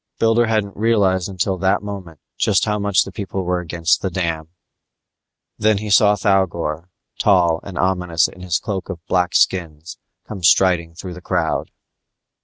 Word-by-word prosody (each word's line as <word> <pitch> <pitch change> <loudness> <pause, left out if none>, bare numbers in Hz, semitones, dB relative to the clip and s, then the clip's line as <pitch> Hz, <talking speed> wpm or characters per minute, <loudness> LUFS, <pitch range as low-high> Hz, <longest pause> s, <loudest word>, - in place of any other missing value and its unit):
Builder 115 +1 +3
hadn't 105 -3 -1
realized 100 -4 +1
until 95 0 -2
that 95 +2 +1
moment 95 -7 -8 0.2
just 100 -3 +2
how 105 -1 -1
much 100 -1 +2
the - - -9
people 95 -2 -4
were 90 0 -1
against 85 0 0
the 95 - -1
dam. 85 -3 -3 1.1
Then 110 -1 +3
he 105 0 -5
saw 105 +1 +5
Thougor, 90 -5 0 0.3
tall 85 -5 +3
and 95 -3 -9
ominous 90 -2 +1
in 90 - -14
his 90 -2 0
cloak 95 -2 -5
of 85 -4 -7
black 90 -1 0
skins, 80 -3 0 0.3
come 100 -3 -7
striding 85 -2 +3
through 90 +1 -7
the 90 - -11
crowd. - - -1
95 Hz, 160 wpm, -20 LUFS, 85-100 Hz, 1.1 s, saw